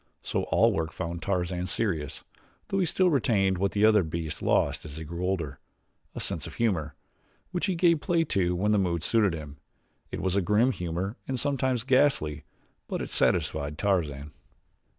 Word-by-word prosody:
So - - -1
all 110 +5 +3
work 80 -3 -2
found 85 -1 -5
Tarzan 90 -1 -1
serious, 80 -10 -2 0.5
though 195 - 0
he 180 - +2
still 185 +2 +3
retained 100 - +2
what 100 +1 0
the 105 +1 +4
other 110 -1 +6
beasts 80 -2 -4
lost - - +1
as 75 -1 -9
they 80 - -6
grew 85 +3 -5
older 85 -7 -2 0.6
a - - -4
sense - - -2
of - - -10
humor, 80 -11 0 0.6
which 180 +1 -1
he 190 - 0
gave 170 -2 +3
play 170 -1 +2
to 90 - 0
when 105 +4 +1
the 105 - +4
mood 85 -4 0
suited 105 -5 +2
him. 75 -2 -8 0.5
It - - -5
was 95 0 0
a 100 - +3
grim 105 +7 +3
humor 90 +2 -3
and 130 -1 -1
sometimes 130 -3 0
ghastly; 125 - +2 0.4
but - - -3
it - - -7
satisfied 75 -1 +1
Tarzan. 75 -7 -1
95 Hz, 180 wpm, -28 LUFS, 80-115 Hz, 0.6 s, other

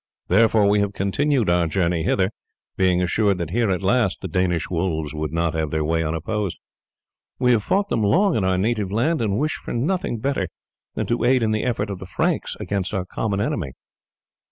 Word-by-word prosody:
Therefore 110 -2 +4
we 105 +1 +3
have 100 0 0
continued 120 +6 +1
our 85 -1 +3
journey 85 -1 0
hither, 95 +3 +1 0.4
being 90 -1 +2
assured 100 +2 +1
that 85 -3 -4
here 115 +1 +1
at 95 0 -1
least 105 0 +1
the 95 - -4
Danish 90 -1 0
wolves 80 -4 -2
would 75 -1 -3
not 85 0 0
have 80 -1 -1
their 80 +1 -1
way 80 +1 +1
unopposed. 85 +5 -2 0.8
We 125 -1 +3
have 115 -3 +3
fought 195 - 0
them 115 - 0
long 175 - +3
in 105 - +1
our 95 0 +2
native 105 -1 0
land, 135 +9 +1
and 105 -3 0
wish 155 +5 0
for - - -4
nothing 155 +1 -1
better 115 -5 -1 0.5
than - - -1
to 120 - -1
aid 125 0 +3
in 110 - +1
the 110 0 0
efforts 110 -4 -1
of 95 - -5
the 95 - -8
Franks 90 - -1
against 100 0 -2
our 95 -2 -1
common 100 +1 -2
enemy." 80 - -2
100 Hz, 205 wpm, -22 LUFS, 90-115 Hz, 0.8 s, Therefore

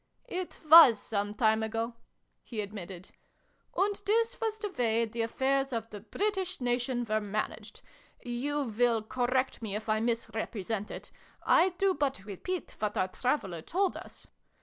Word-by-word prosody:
" - - -36
It 365 - -9
was 310 -7 +10
some 205 -1 -3
time 220 0 +3
ago," 225 +2 -2 0.5
he 230 - -6
admitted. 195 -3 -8 0.7
"And 405 +1 +1
this 460 +3 +2
was 440 -1 -1
the 420 -2 -4
way 230 -5 +1
the 230 +1 -4
affairs 270 +4 0
of 230 -2 -4
the 205 - -7
British 380 - -2
Nation 245 0 0
were 215 0 +1
managed. 210 +1 -4 0.4
(You 280 +5 -1
will 230 -1 +1
correct 255 +3 0
me 210 -3 -3
if 215 +1 -5
I 215 0 +2
misrepresent 225 -2 -2
it. - - -8 0.3
I 360 +3 +5
do 390 -1 +3
but 275 - -2
repeat 330 - -5
what 210 -1 -1
our 185 - +1
traveler 195 - -1
told 375 - 0
us.) - - -9
235 Hz, 155 wpm, -30 LUFS, 215-290 Hz, 0.7 s, was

